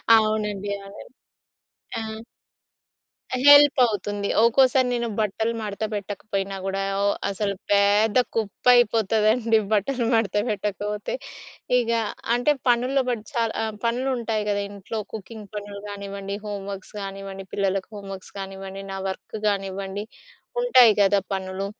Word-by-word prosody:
అవునండి. 210 -2 0
అవును. 200 - -11 0.9
ఆ! - - -3 1.5
హెల్పవుతుంది. 235 -9 +5
ఒక్కోసారి 255 +2 +4
నేను 235 -1 -1
బట్టలు 220 +2 0
మడత 210 0 -4
పెట్టకపోయినా 200 -1 -3
గూడా, 195 0 -1 0.2
ఓ - - +2 0.2
అసలు 200 0 -1 0.2
పేద్ద 205 +2 +4 0.2
కుప్పయిపోతదండి 225 0 +3
బట్టలు 235 +4 +1
మడత 225 -2 +1
పెట్టకపోతే. 210 - -3 0.7
ఇగా 230 -1 +1 0.3
అంటే, 245 +5 +3 0.2
పనుల్లో 250 +3 +3
బడి 225 -3 -3
చాల్ 230 -3 0
ఆహ్, 220 -1 -3
పనులుంటాయి 235 -3 0
గదా 200 0 0
ఇంట్లో 205 +2 -5
కుకింగ్ 215 -1 -8
పనులు 205 -1 -6
గానివ్వండి, 200 0 -5
హోమ్ 200 -1 -5
వర్క్స్ 195 +2 -9
గానివ్వండి, 195 0 -7
పిల్లలకు 195 -1 0
హోం 200 -1 -9
వర్క్స్ 190 - -12
కానివ్వండి, 195 0 -7
నా 195 - -4
వర్క్ 190 +3 -6
గానివ్వండి, 195 0 -3 0.6
ఉంటాయి 255 - +7
గదా 200 0 +5
పనులు. 190 0 -3
205 Hz, 115 wpm, -24 LUFS, 195-230 Hz, 1.5 s, ఉంటాయి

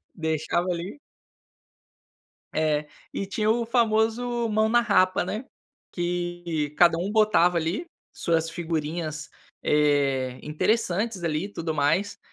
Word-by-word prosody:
Deixava 160 +2 -1
ali 175 +5 -4 1.6
É. 150 -1 +1 0.3
E 195 - -3
tinha 215 +2 0
o 230 +1 +1
famoso 230 +1 +1
"Mão 215 +1 +2
na 240 +1 +4
Rapa", 200 -4 +3
né, 220 +5 -4 0.5
que 175 -3 -2
cada 170 -2 +6
um 190 +4 -2
botava 210 -5 +4
ali 170 - -2 0.3
suas 165 -1 0
figurinhas, 160 -2 -3 0.3
eh, 140 -4 +2
interessantes 200 +5 0
ali 160 0 -1
e 200 - -5
tudo 160 -3 -3
mais. 170 +8 +1
175 Hz, 115 wpm, -26 LUFS, 155-215 Hz, 1.6 s, cada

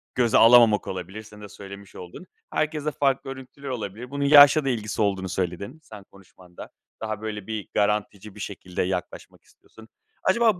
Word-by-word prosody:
göze 120 -3 +3
alamamak 115 -3 +6
olabilir. 95 +4 -6
Senin 105 0 -15
de 105 - -10
söylemiş 100 0 -12
olduğun. 90 - -10 0.3
Herkeste 150 -1 -1
farklı 135 -1 0
örüntüler 135 +1 -10
olabilir. 120 +1 -6
Bunun 140 0 -2
yaşla 145 0 +8
da - - +1
ilgisi 110 -3 -3
olduğunu 95 -2 0
söyledin, 95 - -4
sen 105 -6 -12
konuşmanda, 90 -2 -14 0.3
daha 110 -1 -4
böyle 105 -2 -6
bir, 110 -3 -5
garantici 105 0 -1
bir - - -12
şekilde 90 -3 -5
yaklaşmak 90 -1 -5
istiyorsun. 110 0 -19 0.4
Acaba 220 -1 +3
110 Hz, 160 wpm, -24 LUFS, 100-135 Hz, 0.4 s, yaşla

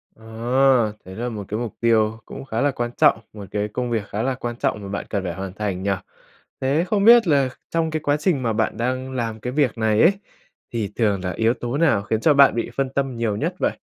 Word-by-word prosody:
Ờ, 110 - -20 0.8
đấy 95 +1 -10
là 120 +3 -3
một 105 -3 -5
cái 105 - -3
mục 120 -3 -5
tiêu 110 -1 +2
cũng 135 - -9
khá 115 -3 -2
là 145 0 +2
quan 120 -2 -3
trọng, - - +5
một 105 -2 -8
cái 105 0 -1
công 120 +3 -3
việc 110 -3 -1
khá 105 +2 -3
là 130 0 0
quan 120 -2 -5
trọng 105 - -1
mà 100 - -7
bạn 100 - -4
cần 100 -3 -2
phải 90 -2 -3
hoàn 95 +1 -6
thành 100 -3 -3
nhỉ? 100 - +1 0.7
Thế 140 +5 +2
không 200 +1 +1
biết 235 -2 +8
là 140 -4 +3 0.2
trong 165 -1 0
cái 155 - -1
quá 145 0 +1
trình 150 -4 0
mà 115 -2 0
bạn 110 -1 -1
đang 130 +3 -2
làm 115 -4 -3
cái 125 +3 -5
việc 140 -6 +1
này 110 -1 +2
ấy, 170 - +7 0.6
thì 110 -4 -2
thường 100 -5 +1
là 90 - -2
yếu 110 +6 +1
tố 120 +2 -4
nào 145 -11 +3
khiến 110 +2 -1
cho 155 - +5
bạn 140 -3 +6
bị 115 - -2
phân 135 -1 0
tâm 135 -2 -2
nhiều 115 -3 -1
nhất 105 - -2
vậy? - - 0
115 Hz, 250 wpm, -22 LUFS, 105-135 Hz, 0.8 s, biết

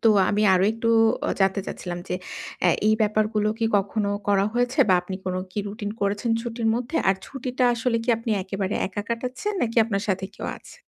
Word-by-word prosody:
তো 225 - +7 0.2
আমি 210 +1 +1
আরো 185 +1 +3
একটু 230 0 -1 0.4
অ - - 0
জানতে 195 +1 +3
চাচ্ছিলাম 175 -1 -5
যে - - -1 0.5
আ - - +6 0.2
এই 215 - +5
ব্যাপারগুলো 215 0 +1
কি 225 - +1
কখনো 200 +1 -1 0.2
করা 200 -1 +4
হয়েছে 245 +3 0
বা 185 - +6
আপনি 185 +1 -5
কোন 185 - -1 0.2
কি - - -4
রুটিন 205 0 -5
করেছেন 205 +3 0
ছুটির 230 -1 -2
মধ্যে? 250 +7 -3
আর 190 - +4
ছুটিটা 255 -1 -2
আসলে 230 0 0
কি - - -12
আপনি 230 0 -4
একেবারে 195 +1 -3
একা 205 +2 -4
কাটাচ্ছেন 250 - -3
নাকি 230 0 -2
আপনার 200 -3 -2
সাথে 190 0 0
কেউ - - -6
আছে? - - -15
215 Hz, 200 wpm, -24 LUFS, 195-235 Hz, 0.5 s, তো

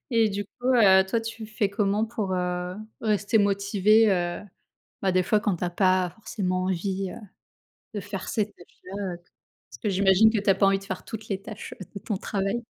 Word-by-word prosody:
et 230 -2 +4
du 205 +1 -3
coup, 245 +5 -9
heu, 190 -5 +6
toi, 225 +4 0
tu 225 0 -6
fais 210 -2 -1
comment 205 +1 +1
pour, 215 -4 -3
heu, 180 0 -2 0.2
rester 215 0 +1
motivée, 200 +2 +3
heu, 175 -1 -1 0.6
bah, 190 -2 +2
des 185 0 +3
fois 210 +3 +2
quand 205 -3 0
tu 175 - -3
as 175 - -1
pas 185 0 +2
forcément 185 -3 -3
envie, 190 +1 -2
heu, - - -9 0.8
de 205 - -2
faire 200 0 -6
ces 215 -2 0
tâches-là? 185 0 -14 0.2
Heu, - - -7 0.5
parce - - -11
que 215 - 0
j'imagine 195 +2 +5
que 220 - 0
tu 205 0 +2
as - - +6
pas 195 +1 +3
envie 195 0 +3
de 195 - -12
faire 190 -1 -5
toutes 220 -1 -8
les 195 -2 -2
tâches 210 +1 -8 0.2
de 200 - -6
ton 210 - -3
travail? 200 +4 -2
200 Hz, 205 wpm, -26 LUFS, 185-215 Hz, 0.8 s, heu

